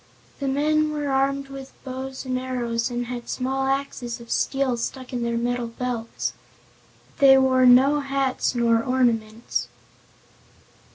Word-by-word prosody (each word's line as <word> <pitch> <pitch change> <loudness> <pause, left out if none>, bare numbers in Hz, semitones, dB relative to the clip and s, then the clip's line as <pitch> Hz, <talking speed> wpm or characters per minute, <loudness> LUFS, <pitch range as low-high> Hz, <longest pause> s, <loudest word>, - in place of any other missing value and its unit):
The 280 - -2
men 305 +3 +2
were 295 -1 -2
armed 275 +1 0
with 270 -1 -9
bows 265 0 -6
and 255 -1 -1
arrows 240 -2 -2
and 245 0 -3
had 240 0 -6
small 265 +1 -1
axes 270 -3 -2
of 235 0 -11
steel 270 -2 +1
stuck 255 +2 -5
in 245 - -2
their 235 0 -1
metal 240 0 -1
belts. 230 -1 -4 0.9
They 270 -1 +8
wore 260 -1 +4
no 265 +4 +6
hats 275 -2 -1
nor 230 -1 +3
ornaments. 235 -3 0
260 Hz, 135 wpm, -24 LUFS, 240-270 Hz, 0.9 s, They